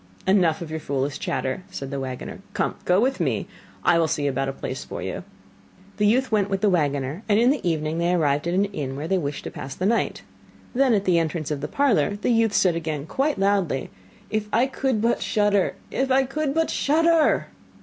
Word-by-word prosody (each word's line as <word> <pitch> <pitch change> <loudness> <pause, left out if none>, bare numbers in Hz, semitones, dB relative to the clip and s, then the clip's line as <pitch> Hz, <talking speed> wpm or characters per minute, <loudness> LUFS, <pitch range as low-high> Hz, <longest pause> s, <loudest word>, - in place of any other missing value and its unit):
'Enough 175 -4 +3
of 160 - -9
your 160 - -3
foolish 140 0 -2
chatter,' 130 +6 -2
said 135 0 -6
the 140 - -3
waggoner. 130 -1 -6 0.2
'Come, - - 0
go 180 +1 +4
with 260 +4 +1
me, - - 0 0.4
I 170 - +4
will 165 - +3
see 145 -2 -1
about 135 -1 0
a - - -1
place - - -5
for - - -6
you.' - - -4 0.7
The 210 -1 +3
youth 255 +4 +2
went 205 -2 +2
with 195 -1 -1
the 210 - +3
waggoner, 145 -1 0
and 205 - +4
in 245 +3 +5
the 290 - -1
evening 155 0 -1
they 170 +1 +1
arrived 145 -2 +1
at 175 - 0
an 195 +2 +3
inn 145 -10 -4
where 145 +3 -4
they 190 +2 +1
wished 145 -3 -4
to - - -6
pass 135 0 -7
the 185 - -2
night. 230 +3 0 0.5
Then 260 -2 +3
at 200 -1 0
the 175 -2 +4
entrance 160 -2 -2
of 145 -2 -2
the 150 - -2
parlour 210 - +2
the 210 +4 -1
youth 225 -3 +3
again 165 -4 0
said 145 - -10
quite 285 +2 0
loudly: 195 -8 0 0.4
'If 215 -1 -1
I 235 +3 +3
could 265 -4 -1
but 235 +1 +2
shudder! 205 -4 +1 0.2
If 265 0 0
I 265 +1 +4
could 280 +2 -2
but 325 0 +1
shudder! 325 +2 +3
185 Hz, 220 wpm, -24 LUFS, 150-230 Hz, 0.7 s, in